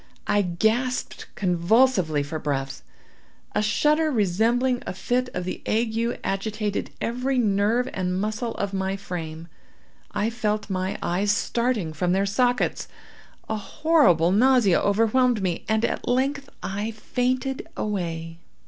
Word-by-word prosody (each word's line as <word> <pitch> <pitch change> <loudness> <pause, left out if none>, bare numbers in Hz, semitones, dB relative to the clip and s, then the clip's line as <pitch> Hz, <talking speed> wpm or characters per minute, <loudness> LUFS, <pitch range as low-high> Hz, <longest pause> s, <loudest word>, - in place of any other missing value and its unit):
I 205 0 +3
gasped 220 +8 -1
convulsively 180 - +2
for 155 +2 -5
breath—a 135 - -6
shudder 300 +9 +2
resembling 235 +3 +1
a - - -4
fit 250 +6 0
of 180 - -2
the 185 - -5
ague 230 +1 0
agitated 205 +1 -2
every 250 +3 -1
nerve 220 +2 +2
and 185 -1 -1
muscle 215 +3 -2
of 200 0 -3
my 190 0 -1
frame—I 175 +4 -6
felt 215 -3 -2
my 185 0 -1
eyes 195 +4 +1
starting 225 -5 0
from 175 +3 0
their 195 +1 +2
sockets—a 245 0 -2
horrible 215 - +3
nausea 235 -3 +4
overwhelmed 225 +2 +2
me—and 215 +5 0
at - - -3
length 275 +3 0
I 205 +3 -2
fainted 255 +4 -2
away. 165 -5 -3
210 Hz, 115 wpm, -24 LUFS, 185-245 Hz, -, nausea